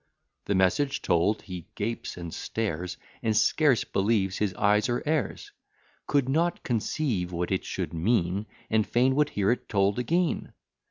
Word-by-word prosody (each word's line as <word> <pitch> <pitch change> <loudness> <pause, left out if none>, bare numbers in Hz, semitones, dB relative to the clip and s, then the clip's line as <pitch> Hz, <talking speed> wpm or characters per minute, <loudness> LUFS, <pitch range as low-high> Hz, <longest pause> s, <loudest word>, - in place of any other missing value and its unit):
The 100 - 0
message 135 +11 +2
told, 85 +6 +2
he 90 -4 -8
gapes, 115 -1 -3
and 85 -2 -6
stares, 90 -6 -3 0.2
And 110 -2 +1
scarce 145 -4 +3
believes 95 -1 0
his 105 -2 +1
eyes 105 +1 +3
or 120 - -1
ears: 150 -8 -1 0.6
Could 140 -3 +2
not 165 +6 +1
conceive 115 - -1
what 85 +1 -2
it 95 - 0
should - - -4
mean, 95 +2 +1 0.2
And 110 -1 +2
fain 130 +2 +3
would 150 +2 +2
hear 100 +1 +1
it 125 - -3
told 100 +1 +2
again. 170 +7 0
105 Hz, 155 wpm, -27 LUFS, 95-130 Hz, 0.6 s, scarce